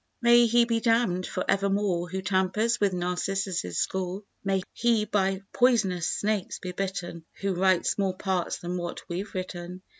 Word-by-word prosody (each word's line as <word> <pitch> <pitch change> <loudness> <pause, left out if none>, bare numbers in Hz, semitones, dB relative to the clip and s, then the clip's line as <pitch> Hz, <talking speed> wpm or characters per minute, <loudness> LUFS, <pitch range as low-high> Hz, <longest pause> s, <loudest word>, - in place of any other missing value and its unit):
May 240 -1 +6
he 235 +1 +4
be 230 -1 +1
damned 225 -6 +1
for 185 - -3
evermore 195 -3 +1
Who 190 +1 -4
tampers 190 +5 +1
with 200 -1 +3
Narcissus' 180 - -2
score; 190 +1 -2 0.2
May 195 -2 0
he 230 -2 +2
by 195 -2 0
poisonous 210 -9 +3
snakes 210 -2 -1
be 180 - -6
bitten 180 -3 -4 0.2
Who 195 -1 0
writes 185 +1 +2
more 190 -2 0
parts 190 -3 -1
than 175 +1 -4
what 175 -1 -5
we've 185 +5 -4
written. 180 0 -5
190 Hz, 155 wpm, -27 LUFS, 180-210 Hz, 0.2 s, May